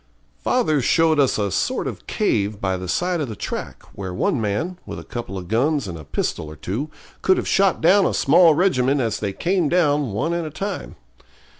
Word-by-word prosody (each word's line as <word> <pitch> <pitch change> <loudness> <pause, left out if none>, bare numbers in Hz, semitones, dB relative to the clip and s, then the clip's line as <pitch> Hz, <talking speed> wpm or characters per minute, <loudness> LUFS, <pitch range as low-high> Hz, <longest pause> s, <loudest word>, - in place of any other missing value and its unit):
Father 155 - +1
showed 160 +4 +3
us 135 -2 +3
a 100 -2 -1
sort - - -1
of - - -6
cave 100 0 0
by 95 -1 0
the 90 0 -5
side 175 - 0
of 140 - -3
the 110 - -5
track, - - -6
where 95 -1 -6
one 110 +7 0
man, 160 - -2
with - - -7
a - - -8
couple 115 -5 -6
of 90 -2 -7
guns 135 - +1
and 90 - -5
a 80 - -9
pistol 75 +1 -3
or 75 - -9
two, 110 - -4 0.3
could 190 - +3
have - - -2
shot 195 -2 +2
down 190 +4 +5
a - - -1
small 160 +3 +5
regiment 140 -6 +2
as 115 -4 -1
they 100 -2 -2
came 175 - 0
down 145 - +2
one 135 +12 -1
at 170 0 -1
a 155 - -4
time. 195 +7 -5
140 Hz, 210 wpm, -22 LUFS, -, 0.3 s, down